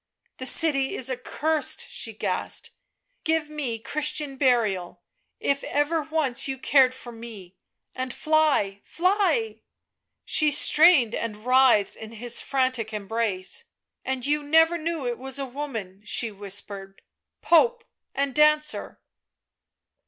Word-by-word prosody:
" - - -46
The 260 - -2
city 275 -4 +1
is 260 0 0
accursed," 300 +5 0
she - - -5
gasped; - - -3 0.3
" - - -49
give 320 -2 0
me 275 -7 -3
Chris 295 +6 -2
tian 290 -3 -3
burial, 215 -10 0 0.4
if 280 0 -1
ever 290 +3 0
once 290 -4 0
you 265 -1 -3
cared 260 -1 +3
for 245 -2 -10
me, 220 -6 -11 0.4
and 255 -1 -4
fly, 295 -11 +1
fly 405 +5 0 0.3
!" - - -61 0.3
She 305 - +2
strained 295 -4 +5
and 215 -1 -5
writhed 255 -5 +4
in 220 0 -10
his 235 +1 +1
frantic 255 -5 -1
embrace. 215 - -2 0.2
" - - -60
And 260 -1 -3
you 295 +1 +1
never 325 +3 +3
knew 325 -3 -3
it 240 -1 -3
was 265 +1 -4
a 275 - -2
woman," 240 -8 -6
she 220 +2 -1
whis 200 0 -5
pered, 195 -1 -10 0.3
" - - -61
Pope 465 +8 +4 0.3
and 275 -1 -1
dancer. 300 0 +2
265 Hz, 145 wpm, -25 LUFS, 230-305 Hz, 0.4 s, strained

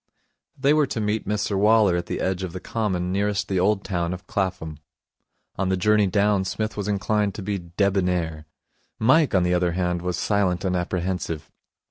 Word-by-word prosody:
They 140 +2 +3
were 150 -2 +3
to 120 - -3
meet 105 0 -1
Mr 105 0 -1
Waller 105 -2 +4
at 85 0 -2
the - - -3
edge 95 0 -1
of 90 -3 -5
the 90 - -5
Common 95 -4 -2
nearest 100 +1 0
the 95 -2 0
old 100 +2 +2
town 85 -2 -2
of 90 - -13
Clapham. 95 -6 -3 0.8
On 95 -1 0
the 95 - +1
journey 105 +2 +3
down 100 0 +2
Psmith 110 +3 -3
was 105 -1 -3
inclined 105 0 0
to 100 - -6
be 100 0 -2 0.2
debonnaire. 90 -6 0 0.5
Mike, 130 +3 +3
on 90 - +4
the 90 0 +1
other 90 -1 +1
hand, 90 -1 -1
was 90 0 -2
silent 95 -4 0
and 90 -1 0
apprehensive. 90 -2 -3
95 Hz, 185 wpm, -24 LUFS, 90-105 Hz, 0.8 s, Waller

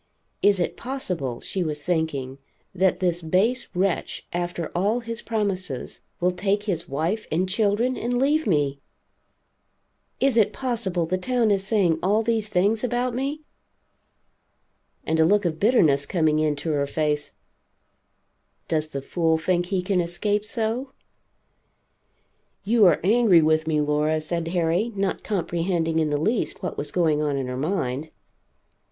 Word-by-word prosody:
Is 200 -2 +4
it 175 - -1
possible, 180 - -4
she 190 - -3
was 150 -2 -4
thinking, 145 -6 -2 0.3
that 185 0 +1
this 175 -1 +1
base 195 +10 +1
wretch, 185 0 -1
after 175 -1 -3
all 205 +7 +1
his 230 0 -6
promises, 190 - -3 0.2
will 180 +1 +2
take 195 +3 -1
his 180 -6 -3
wife 165 +10 -2
and 180 +4 +1
children 215 +5 +1
and 245 +1 -1
leave 295 +4 +2
me? 145 -6 +1 1.4
Is 270 -3 +2
it 220 - +4
possible 220 -10 -1
the 185 +3 -1
town 240 +1 +1
is 195 -1 0
saying 185 -8 +2
all 210 +4 +2
these 225 -2 0
things 210 +4 +1
about 245 0 0
me? 275 +5 -3 1.6
And 160 0 0
a - - +6
look 205 +4 +3
of 160 -2 -1
bitterness 160 - +3
coming 155 -3 +2
into 155 0 0
her 140 -1 0
face 150 0 -1 1.3
does 155 -1 0
the 140 -2 -5
fool 165 +1 +1
think 175 +2 0
he 185 -1 -1
can 185 -1 +1
escape 205 +5 -1
so? 235 +4 -2 1.7
"You 215 0 +5
are 170 - +4
angry 205 -4 +5
with 155 0 +2
me, 155 -1 +1
Laura," 150 +1 +1
said 165 +1 -3
Harry, 175 +6 0
not 195 -1 -1
comprehending 170 -4 -1
in 155 -1 +1
the 145 - 0
least 210 +6 -1
what 180 - -3
was 145 - -4
going 160 -4 +1
on 145 -2 0
in 135 - -2
her 125 0 -4
mind. 145 -1 -2
180 Hz, 150 wpm, -24 LUFS, 155-215 Hz, 1.7 s, a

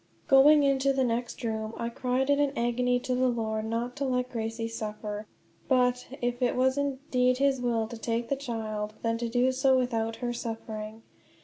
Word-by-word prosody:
Going 290 +2 +7
into 275 0 +3
the 265 -1 +1
next 240 0 -2
room 220 -1 -3
I 235 - -2
cried 255 +3 0
in 285 - +3
an 285 -1 +2
agony 245 +1 +1
to 255 0 -2
the 255 +1 +2
Lord 220 -3 -1
not 235 +2 -2
to 280 - -2
let 250 -1 -1
Gracie 225 0 -3
suffer; 210 -1 -5 0.4
but, 250 -1 +2 0.2
if 245 +1 -1
it 245 - +2
was 260 +1 +3
indeed 265 -3 +1
his 270 -1 +2
will 230 -2 0
to 235 0 -8
take 230 +1 -2
the 275 - 0
child, 215 -5 -4
then 230 0 0
to 235 -1 -2
do 245 +2 +2
so 265 0 +3
without 225 -3 -1
her 240 0 -3
suffering. 220 -1 -6
245 Hz, 190 wpm, -28 LUFS, 225-260 Hz, 0.4 s, Going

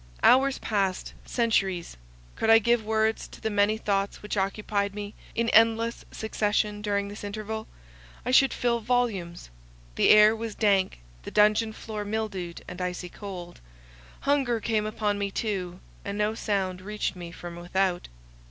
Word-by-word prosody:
Hours 265 +1 +5
passed—centuries. 195 -1 -1 0.4
Could 225 - 0
I 225 - +9
give 235 +1 +2
words 220 0 0
to - - -13
the 220 - -2
many 205 +1 +2
thoughts 200 -2 -1
which 210 - -3
occupied 200 0 -1
me 205 0 -6 0.2
in 230 0 +1
endless 230 +1 +3
succession 210 -1 -1
during 200 -1 -1
this 205 +1 -9
interval, 215 +1 -5 0.6
I 250 - 0
should 270 +1 +6
fill 235 -1 0
volumes. 215 - -1 0.4
The - - +3
air 215 +1 +8
was 225 -1 -5
dank, 195 - +2 0.2
the - - -7
dungeon 215 +1 +3
floor 215 -1 -6
mildewed 205 -5 -4
and 180 +1 -7
icy 180 0 -3
cold; 180 -3 -8 0.6
hunger 270 -5 +1
came 215 -1 0
upon 210 -1 -1
me 200 0 -1
too, 190 -4 -3 0.2
and 200 0 -4
no 210 +1 +1
sound 190 -4 -2
reached 210 0 -3
me 175 -1 -8
from 175 0 -8
without. 175 +1 -1
210 Hz, 150 wpm, -27 LUFS, 195-220 Hz, 0.6 s, I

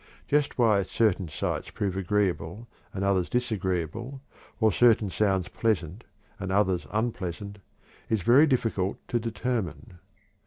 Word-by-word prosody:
Just 145 0 +1
why 110 -5 +4
certain 95 -3 0
sights 75 - -3
prove 100 -4 -2
agreeable 95 +1 -1 0.2
and 95 - -4
others 95 -3 +1
disagreeable, 110 - -2 0.4
or 110 -2 +4
certain 110 -4 +4
sounds 95 -4 +1
pleasant 105 -2 -1 0.3
and 95 -1 -4
others 95 -3 +1
unpleasant, 100 -3 -3 0.5
is 110 -5 0
very 135 - +6
difficult 110 -8 0
to 120 - +1
determine. 110 - -3
105 Hz, 120 wpm, -27 LUFS, 95-115 Hz, 0.5 s, very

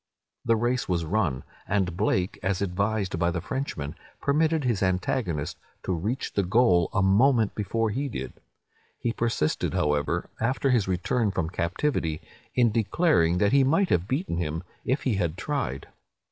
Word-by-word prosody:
The 115 -1 +3
race 120 +1 0
was 85 -2 0
run; 80 -8 0 0.2
and 95 -4 0
Blake, 90 +1 0
as 95 0 0
advised 100 -1 -1
by 85 - +2
the 85 0 -2
Frenchman, 90 - -4 0.3
permitted 155 +2 +2
his 115 -5 0
antagonist 90 - -1 0.2
to 95 - -1
reach 105 +10 -2
the 100 - +2
goal 95 -3 +3
a 105 - +1
moment 110 +3 +4
before 110 +1 -1
he 135 +6 -2
did. 115 - -5 0.6
He 120 - -2
persisted, 115 -11 0
however, 75 -1 0
after 130 +3 +1
his 115 -6 +2
return 95 +5 0
from 90 -4 -2
captivity, 85 - -1 0.4
in 120 -3 +4
declaring 105 - +2
that 100 +2 +3
he 140 -1 +5
might 165 +8 +2
have 90 +2 +2
beaten 135 - -1
him, 80 0 -2 0.2
if 130 +4 0
he 120 -7 +1
had 85 -3 -1
tried. 135 - -3
100 Hz, 160 wpm, -26 LUFS, 85-125 Hz, 0.6 s, he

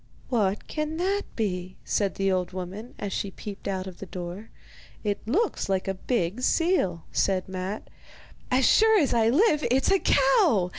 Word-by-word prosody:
'What 210 -5 0
can 305 +1 -3
that 390 +4 0
be?' 185 -4 -2
said 200 -2 0
the 195 0 +1
old 185 -1 -1
woman, 190 +6 -7
as 200 -2 -4
she 200 - -2
peeped 200 +1 -8
out 190 -1 -2
of 185 -2 -9
the 195 - -7
door. 180 +4 -7 0.5
'It 205 -2 -1
looks 390 - 0
like 190 -1 0
a 195 - 0
big 195 +1 -1
seal,' 255 - +1
said 190 -2 +1
Matte. 190 +2 -5 0.6
'As 255 0 +3
sure 440 - +5
as 290 - +2
I 225 -1 +3
live, 300 - +3
it's 265 +7 +2
a 390 - +4
cow! 255 - +3
205 Hz, 175 wpm, -26 LUFS, 185-270 Hz, 0.6 s, sure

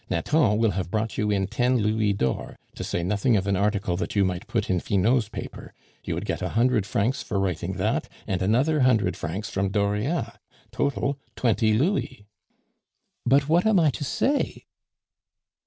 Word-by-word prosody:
"Nathan 105 - +2
will 115 -1 +2
have 95 -1 -3
brought 110 +2 -2
you 105 - +1
in 100 -2 +1
ten 125 +5 +1
louis 110 -1 +1
d'or, 65 -10 -2 0.2
to - - -6
say 85 - -2
nothing 105 +5 +2
of 95 - -1
an 100 -1 +1
article 100 -2 0
that - - -4
you 100 -1 +4
might 90 -2 -3
put - - -1
in 90 -1 +1
Finot's 110 +5 +1
paper; - - -8 0.3
you - - -3
would - - -4
get - - -3
a - - -2
hundred 120 -4 +2
francs 115 +7 0
for 100 - -2
writing 95 -1 -2
that, 95 -1 -1 0.2
and 95 -1 -2
another 130 +11 +2
hundred 110 -8 +3
francs 100 +7 -5
from 100 0 0
Dauriat 105 - -1 0.3
total, 140 0 -1 0.2
twenty 110 -2 +2
louis." 130 - -1 1.0
"But 135 +2 +4
what 170 +6 +3
am 215 -4 +4
I 155 -3 +4
to 145 - -5
say?" 280 - -1
105 Hz, 175 wpm, -25 LUFS, 95-130 Hz, 1.0 s, you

